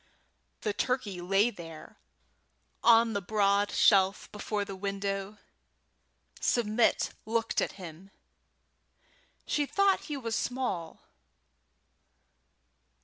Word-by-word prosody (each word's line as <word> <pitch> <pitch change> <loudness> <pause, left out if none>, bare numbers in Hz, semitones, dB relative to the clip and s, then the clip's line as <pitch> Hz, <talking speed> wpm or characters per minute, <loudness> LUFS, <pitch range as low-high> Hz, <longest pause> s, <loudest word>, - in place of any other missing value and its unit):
The 210 - -1
turkey 210 -6 -2
lay 195 +6 +2
there 165 -5 -11 0.8
on 230 -1 +6
the 200 - -1
broad 200 +1 +2
shelf 195 -1 +3
before 210 0 -3
the 195 - -7
window. 195 +1 -3 1.0
Submit 230 -1 +2
looked 225 +1 0
at - - -2
him. 180 0 -11 1.4
She 290 -1 0
thought 395 +3 +2
he 295 -2 -4
was 230 -4 -3
small. 235 -12 -3
205 Hz, 90 wpm, -29 LUFS, 195-230 Hz, 1.4 s, on